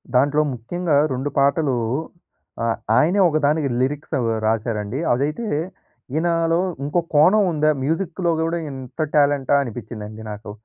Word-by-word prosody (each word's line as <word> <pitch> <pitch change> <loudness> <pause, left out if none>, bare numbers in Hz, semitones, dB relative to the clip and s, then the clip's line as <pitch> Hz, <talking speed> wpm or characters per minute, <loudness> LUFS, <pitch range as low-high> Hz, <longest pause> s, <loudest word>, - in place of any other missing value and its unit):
దాంట్లో 145 +4 +4
ముఖ్యంగా 155 +7 -2 0.2
2 130 +3 -2
పాటలు 140 0 +2 0.9
ఆహ్, 115 - 0 0.2
ఆయనే 180 +6 +3
ఒకదానికి 150 -1 +1
లిరిక్స్ 145 +5 -2
అవి 115 -2 0 0.2
రాసారండి. 110 +1 -1
అదైతే, 150 - -1 0.7
ఈయనలో 165 0 +1 0.3
ఇంకో 150 +4 +1
కోణం 185 +8 +6
ఉందా? 155 -1 +2
మ్యూజిక్‌లో 170 +3 -1
కూడా 165 +1 -1
ఇంత 130 +2 -10 0.2
టాలెంటా 145 -2 +3
అనిపించిందండి 110 -3 -8
నాకు. 105 0 -8
145 Hz, 120 wpm, -21 LUFS, 125-165 Hz, 0.9 s, కోణం